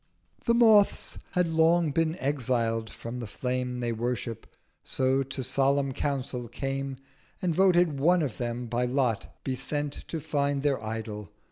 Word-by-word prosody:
The 235 - +4
Moths 220 -4 +4
had 180 -2 +2
long 165 0 +3
been 165 +3 +1
exiled 120 -6 0
from 115 +2 -7
the 120 - -5
Flame 125 +2 -2
They 120 -1 0
worship: 115 0 -3 0.4
so 130 +1 +1
to 135 0 -4
solemn 135 +2 +2
Council 130 -3 -2
came, 135 +1 -3 0.4
And 180 -2 0
voted 175 -4 +4
One 175 +4 +4
of 130 -7 -3
them 120 0 -2
by 120 +1 0
Lot 125 -4 0
be 130 - -1
sent 145 +2 -2
To 165 - -3
find 145 -2 0
their 135 -6 +1
Idol. 110 -2 -5
135 Hz, 150 wpm, -28 LUFS, 120-155 Hz, 0.4 s, The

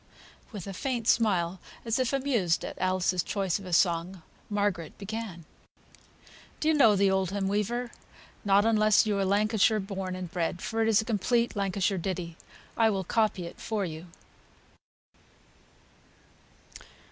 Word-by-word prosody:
With 205 -6 -7
a 195 - -6
faint 240 +2 -3
smile, 190 -7 +2 0.3
as 230 +2 0
if 255 -2 +1
amused 250 -11 0
at - - -6
Alice's 185 -1 +1
choice 195 0 -1
of 195 - -10
a - - -7
song, 170 +1 +1 0.3
Margaret 205 -5 -1
began. 205 -5 -6 1.1
Do 310 - +1
you - - +4
know 230 -9 +5
"The 195 0 +3
Oldham 190 +1 0
Weaver?" 230 +5 -1 0.5
Not 200 0 +4
unless 215 -2 +4
you 210 -1 0
are - - +2
Lancashire 215 +2 +2
born 190 -2 -4
and 180 -2 -6
bred, 175 -1 -2
for 225 0 -2
it 225 - +2
is 220 -1 +4
a - - -8
complete 235 +2 0
Lancashire 195 -1 0
ditty. 170 -2 -4 0.4
I 225 -1 +4
will 195 -3 -1
copy 210 -2 0
it 170 - -10
for 215 -3 -2
you. 160 +1 -7
200 Hz, 145 wpm, -28 LUFS, 185-220 Hz, 1.1 s, know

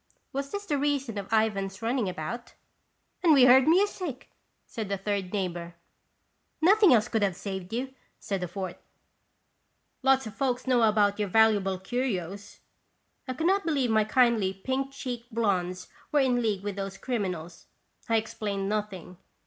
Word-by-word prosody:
Was 275 +1 -3
this 405 +4 -5
the 290 -7 0
reason 275 -6 -1
of 195 - -8
Ivan's 205 -2 0
running 230 -3 0
about? 185 +8 -6 0.7
"And 335 -3 +5
we 265 -3 +7
heard 255 +2 +7
music! 355 -5 +1 0.2
" - - -47
said 215 -3 -6
a 200 - 0
third 195 -1 -2
neigh 195 -3 0
bor. 170 -1 -8 0.4
" - - -47 0.3
Nothing 395 +3 +6
else 230 -2 +4
could 225 -3 -1
have 195 -3 +1
saved 190 -2 -6
you," 260 +3 -3 0.2
said 195 -3 -4
a 180 - -2
fourth; 185 0 -5 1.2
"lots 270 -1 +3
of 215 - -7
folks 255 0 -1
know 255 -2 +3
about 210 -2 +3
your 205 -2 -1
valuable 205 -2 +3
curios" 200 -2 -4 0.7
I 255 - -2
could 320 - -2
not 390 +3 +3
believe 280 -7 0
my 220 -1 +4
kindly 215 -4 +2
pink 265 +7 -2
cheeked 245 -3 -6
blondes 185 -5 -1 0.2
were 295 - +3
in 250 -2 +2
league 210 -4 -1
with 205 -1 -4
those 195 0 -4
criminals. 185 -10 -4 0.4
I 225 - +3
explained 205 -3 -2
nothing. 200 -4 -4
220 Hz, 165 wpm, -28 LUFS, 195-260 Hz, 1.2 s, we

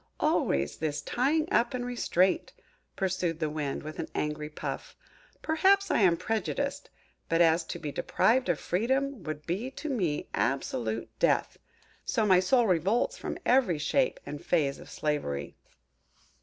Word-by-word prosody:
"Always 70 +1 +1
this 150 -2 -2
tying 300 - +1
up 240 +2 +2
and 245 -1 -3
restraint!" 195 -7 +1 0.4
pursued 180 -4 -1
the 155 -2 -1
Wind, 150 -3 -3
with 155 +1 -7
an - - -3
angry 150 0 -2
puff. 150 - -6 0.5
"Perhaps 390 +5 +3
I - - +3
am 180 -5 +4
prejudiced; 225 +8 -2 0.4
but 165 - +2
as 165 0 +4
to - - -5
be 150 -2 -5
deprived 240 - +2
of 170 - +1
freedom 265 +6 0
would 155 -2 -6
be 200 +9 -2
to 305 +3 -6
me 180 - -1
absolute 115 -1 -1
death, - - +1 0.4
so 220 - 0
my 185 -3 +6
soul 235 +6 +3
revolts 200 - +1
from - - -4
every 245 -10 +3
shape 255 - +1
and 145 - -7
phase 145 -5 +1
of - - -12
slavery!" 105 - -2
180 Hz, 150 wpm, -29 LUFS, 150-245 Hz, 0.5 s, my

